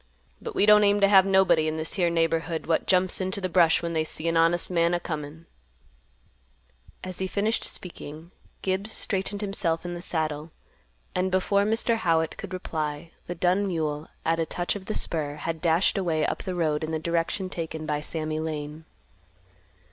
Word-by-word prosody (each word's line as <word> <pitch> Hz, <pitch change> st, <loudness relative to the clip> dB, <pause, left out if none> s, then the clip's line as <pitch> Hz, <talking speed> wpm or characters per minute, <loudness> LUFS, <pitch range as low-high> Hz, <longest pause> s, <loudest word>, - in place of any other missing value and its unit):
But -, -, -6 dB
we -, -, +4 dB
don't 210 Hz, 0 st, +7 dB
aim 205 Hz, 0 st, +4 dB
t' 200 Hz, -, +5 dB
have 195 Hz, -1 st, +6 dB
nobody 185 Hz, -5 st, +4 dB
in 155 Hz, 0 st, -2 dB
this 160 Hz, 0 st, -1 dB
here 175 Hz, -3 st, +2 dB
neighborhood 165 Hz, 0 st, 0 dB
what 165 Hz, 0 st, 0 dB
jumps 185 Hz, 0 st, +2 dB
into 190 Hz, +2 st, -1 dB
th' 185 Hz, -3 st, -4 dB
brush 170 Hz, -2 st, +4 dB
when 170 Hz, 0 st, -2 dB
they 160 Hz, -1 st, +1 dB
see 155 Hz, +1 st, -2 dB
an 165 Hz, -, +1 dB
honest 165 Hz, +2 st, +3 dB
man 170 Hz, 0 st, +2 dB
a -, -, 0 dB
comin'." 155 Hz, -1 st, -6 dB, 1.6 s
As 185 Hz, -1 st, -5 dB
he 190 Hz, -, -1 dB
finished 210 Hz, +4 st, 0 dB
speaking, 165 Hz, -1 st, -8 dB, 0.3 s
Gibbs 195 Hz, +3 st, 0 dB
straightened 200 Hz, 0 st, -2 dB
himself 180 Hz, -5 st, -1 dB
in 175 Hz, -, -4 dB
the 175 Hz, -, -6 dB
saddle, 155 Hz, -3 st, -2 dB, 0.6 s
and 185 Hz, +1 st, 0 dB
before 200 Hz, +2 st, +2 dB
Mr. 225 Hz, +2 st, +2 dB
Howitt 165 Hz, -5 st, +1 dB
could 200 Hz, -, -7 dB
reply, 160 Hz, -3 st, -4 dB, 0.2 s
the 175 Hz, -, -4 dB
dun 185 Hz, +4 st, +2 dB
mule, 155 Hz, -4 st, -2 dB, 0.2 s
at 165 Hz, +1 st, +1 dB
a 165 Hz, -, +1 dB
touch 175 Hz, +2 st, -2 dB
of 195 Hz, -2 st, -7 dB
the 215 Hz, -, -3 dB
spur, 150 Hz, -3 st, -2 dB
had 165 Hz, +1 st, -4 dB
dashed 170 Hz, +3 st, +2 dB
away 160 Hz, -4 st, +1 dB
up -, -, -2 dB
the 185 Hz, -, -4 dB
road 155 Hz, -3 st, 0 dB
in 155 Hz, -, -2 dB
the 160 Hz, -, -1 dB
direction 170 Hz, +4 st, -1 dB
taken 160 Hz, -3 st, -5 dB
by 150 Hz, -1 st, -1 dB
Sammy 155 Hz, 0 st, -3 dB
Lane. 155 Hz, 0 st, -5 dB
170 Hz, 185 wpm, -26 LUFS, 160-190 Hz, 1.6 s, don't